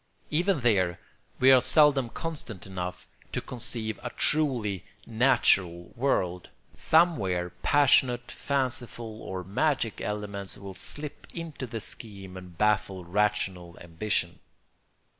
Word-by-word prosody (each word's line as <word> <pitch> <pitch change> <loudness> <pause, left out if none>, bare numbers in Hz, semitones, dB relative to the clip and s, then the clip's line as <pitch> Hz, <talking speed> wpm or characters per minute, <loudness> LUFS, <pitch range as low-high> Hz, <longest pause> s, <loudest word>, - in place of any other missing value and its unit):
Even 170 0 +2
there 95 -7 +2 0.4
we 130 +1 +7
are 130 -1 +7
seldom 145 -5 +4
constant 135 - -6
enough 90 -2 -5 0.2
to - - -1
conceive 115 -2 -4
a 125 - -4
truly 120 - +1 0.2
natural 95 -8 +2
world; 90 -9 0 0.2
somewhere 100 - +2
passionate, 130 -4 +3
fanciful, 120 -5 -3
or 95 -1 -5
magic 115 - 0
elements 105 -2 -4
will 100 -1 -8
slip 145 +9 -7
into 165 -6 -5
the 115 -1 -5
scheme 100 -4 -8
and 90 -2 -10
baffle 105 -3 +1
rational 95 -2 -1
ambition. 85 +1 -2
110 Hz, 110 wpm, -28 LUFS, 95-130 Hz, 0.4 s, we